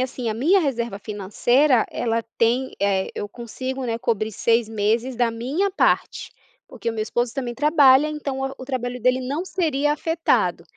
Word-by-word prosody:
assim, 255 -2 -3
a - - -2
minha 340 - +3
reserva 235 - -2
financeira 225 +6 +2
ela 230 -1 -1 0.2
tem 245 +3 +2
eh, 195 -1 +1
eu 205 - -5
consigo 255 +3 -6
né 230 -1 -2
cobrir 220 -2 -1
6 230 +2 +1
meses 225 +4 0
da 240 -2 +1
minha 275 +13 -1
parte, - - 0 0.4
porque - - -5
o - - -1
meu 215 -1 -2
esposo 240 +2 -2
também 245 -3 -3
trabalha, 290 -1 +5
então, 295 -3 -4 0.2
o 260 - -9
trabalho 250 -2 -4
dele 255 +1 +3
não 285 +8 -3
seria 295 -6 0
afetado. 325 +2 0
250 Hz, 165 wpm, -22 LUFS, 230-275 Hz, 0.4 s, trabalha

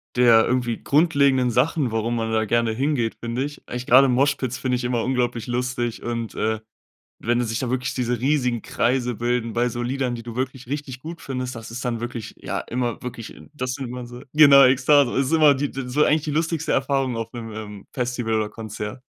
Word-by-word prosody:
der 120 -2 +6
irgendwie 120 -2 -1
grundlegenden 140 -5 +3
Sachen, 130 +1 +1
warum 115 +1 -1
man 115 -1 -2
da 110 0 +1
gerne 115 +1 +1
hingeht, 125 -1 0
finde 120 +3 -2
ich. 145 0 -7
Eigentlich 125 +1 -5
gerade 130 +3 +7
Moshpits 130 -1 +1
finde 130 -1 0
ich 125 - -3
immer 120 -2 0
unglaublich 120 -3 -1
lustig 120 -1 -2
und, 115 -1 -4
äh, 110 0 0 0.6
wenn 120 +1 +1
die 125 - 0
sich 115 0 -2
da 130 - -2
wirklich 125 -1 -2
diese 125 -2 -1
riesigen 125 -3 +1
Kreise 125 -1 0
bilden 120 0 -1
bei 120 +1 +1
so 120 +1 -4
Liedern, 130 0 -1
die 115 - -7
du 120 -1 -8
wirklich 130 -1 -4
richtig 135 -2 -5
gut 165 +3 -8
findest, 130 -4 -4
das 115 0 -9
ist 125 +3 -6
dann 120 -2 -2
wirklich, 120 -2 -6
ja, - - -4
immer 120 -2 -3
wirklich 120 -3 -7 0.2
das 130 -3 -3
sieht 135 -3 -5
man 125 0 -6
so 120 +1 -10
genau, 140 -2 +8
Ekstase, 130 +1 +4
ist 135 +3 +1
immer 150 -3 +6
die 145 +2 -2
d 135 -2 -5
so 145 +4 +2
eigentlich 155 +1 +3
die 150 - -3
lustigste 160 +1 -1
Erfahrung 135 -3 0
auf 115 +2 -5
'nem, 115 -2 -7
ähm, 105 -2 -8
Festival 125 -4 -2
oder 105 -1 0
Konzert. 110 +2 -7
125 Hz, 210 wpm, -23 LUFS, 115-135 Hz, 0.6 s, genau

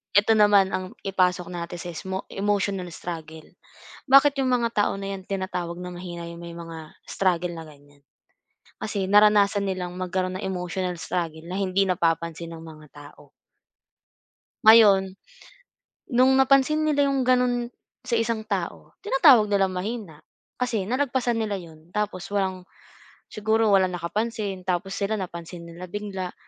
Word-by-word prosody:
ito 205 +2 +5
naman 205 -3 +5
ang 185 - -1 0.2
ipasok 180 -2 +1
natin 175 0 -5
sa 175 +1 -7
ismo 190 +3 -4 0.2
emotional 200 -2 -1
struggle. 160 -2 -8 0.7
Bakit 275 +1 +6
yung 260 - +1
mga 240 -2 +2 0.2
tao - - -1
na 195 0 -4
yan 190 - -12
tinatawag 180 -3 -3
na 180 - -6
mahina 175 -1 -7
yung 170 0 -9
may 170 - -8
mga 165 -2 -9 0.2
struggle 180 -2 0
na 165 - -7
ganyan? 145 -2 -18 0.8
Kasi 205 -2 -2
naranasan 205 0 +5
nilang 180 -2 -3
magkaroon 185 0 -2
ng - - -4
emotional 180 -1 -3
struggle 160 -1 -3
na 180 +2 -5
hindi 195 0 +1
napapansin 170 -2 -1
ng 160 - -11
mga 155 -1 -12
tao. 145 0 -15 1.3
Ngayon, 200 -4 +7 1.0
nung 255 +2 +5
napansin 275 +3 +4
nila 295 -2 +2
'yong 275 -1 +1
gano'n 250 -1 +1 0.3
sa 245 -2 0
isang 230 -1 -1
tao 200 -5 -5
tinatawag 270 - +6
nilang 195 -2 +2
mahina, 190 -3 -5 0.4
kasi 240 -5 0
nalagpasan 255 -2 0
nila 215 -2 -1
'yon 165 -2 -12
tapos 210 -4 -2
walang 190 -2 -1 0.7
siguro 220 +1 +1
walang 190 -2 +3
nakapansin. 195 +2 -3
Tapos 190 +2 -2
sila 200 +1 -1
napansin 175 -3 -6
nila 170 +2 -9
bigla, 190 -1 -5
190 Hz, 145 wpm, -25 LUFS, 175-215 Hz, 1.3 s, Ngayon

